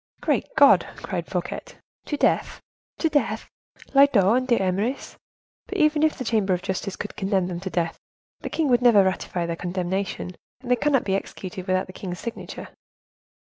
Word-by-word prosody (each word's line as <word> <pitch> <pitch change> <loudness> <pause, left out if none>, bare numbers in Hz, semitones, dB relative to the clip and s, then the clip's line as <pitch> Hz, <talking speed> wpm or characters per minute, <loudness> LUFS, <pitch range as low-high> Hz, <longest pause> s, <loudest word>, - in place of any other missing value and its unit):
"Great - - 0
God!" - - +7 0.2
cried - - -3
Fouquet, - - -3 0.4
"to 295 - -2
death, - - +1 0.4
to 325 - +1
death! 295 -2 0 0.5
Lyodot 240 -7 +5
and 255 0 0
D'Eymeris. 215 +2 0 0.5
But 400 - -4
even 305 -3 +3
if 315 0 +2
the - - -4
Chamber 205 -5 +2
of 180 - -7
Justice 190 0 -3
should 205 - -5
condemn 190 -2 0
them 175 -1 -4
to 190 +1 -5
death, 170 -2 -2 0.4
the - - -5
king 320 -2 0
will 245 -2 +3
never 230 -5 +6
ratify 185 -2 -1
their 170 0 -2
condemnation, 180 +1 -3 0.3
and 250 -1 -5
they - - +6
cannot 275 +2 +2
be 190 - -1
executed 185 -1 -6
without 185 0 +1
the 185 - -12
king's 180 -2 -6
signature." 235 - -7
195 Hz, 175 wpm, -24 LUFS, 185-255 Hz, 0.5 s, God